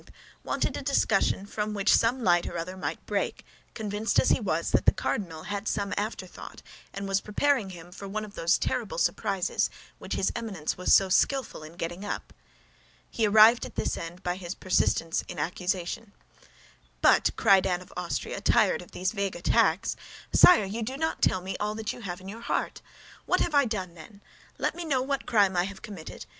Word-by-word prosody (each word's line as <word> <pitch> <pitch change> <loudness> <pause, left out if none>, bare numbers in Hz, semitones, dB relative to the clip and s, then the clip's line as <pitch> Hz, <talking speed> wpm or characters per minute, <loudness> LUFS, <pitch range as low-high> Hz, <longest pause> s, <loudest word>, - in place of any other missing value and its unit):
wanted - - -1
a - - -4
discussion 225 -8 +1
from 210 +1 -3
which 200 0 +3
some 240 +2 +1
light 175 -3 +3
or 175 - -5
other 175 +3 -4
might 190 - -5
break, - - -2 0.3
convinced 215 0 0
as - - +3
he - - +4
was - - -1
that - - +2
the - - +9
cardinal 165 -7 -3
had 205 +1 -4
some 200 0 -1
afterthought 205 -3 -6 0.3
and 200 0 -5
was 195 0 +1
preparing 225 0 +1 0.2
for 200 - -9
him 195 - -7
one 215 +1 -3
of 205 - -13
those 170 -1 +2
terrible - - -2
surprises 200 - 0 0.3
which - - -4
his - - +1
Eminence 200 -10 -3
was 180 - -1
so 195 - +6
skillful 265 - +1
in 155 +1 -10
getting 175 +3 -5
up. 205 - -5 0.8
He 225 -2 +1
arrived 220 +3 +7
at - - -8
this - - -1
end 170 +2 -8
by 180 0 -1
his 180 -1 -6
persistence 165 -3 +1
in - - -8
accusation. 180 +4 -3 0.9
"But," - - +5
cried 195 -3 +4
Anne 180 -1 0
of 180 - -14
Austria, 180 +2 -3
tired 205 -2 +3
of 175 - -15
these 185 +1 -1
vague 200 -3 -2
attacks, - - +2 0.4
"but, - - +2
sire, 350 - +8
you 210 +4 -4
do 255 +4 -4
not 320 +2 -2
tell 185 - +2
me 190 +1 -5
all 210 +1 -2
that 220 -1 -3
you 245 - -11
have 180 -5 -5
in 185 - -12
your 220 +4 -8
heart. - - -2 0.5
What - - +2
have 335 - 0
I 285 -2 +5
done, 190 -6 -3
then? 200 +5 -14 0.4
Let - - 0
me 345 - -6
know 270 -6 0
what 275 0 -2
crime 205 -6 +3
I 175 0 +2
have 200 0 -9
committed. 195 -7 -9
200 Hz, 200 wpm, -27 LUFS, 180-220 Hz, 0.9 s, the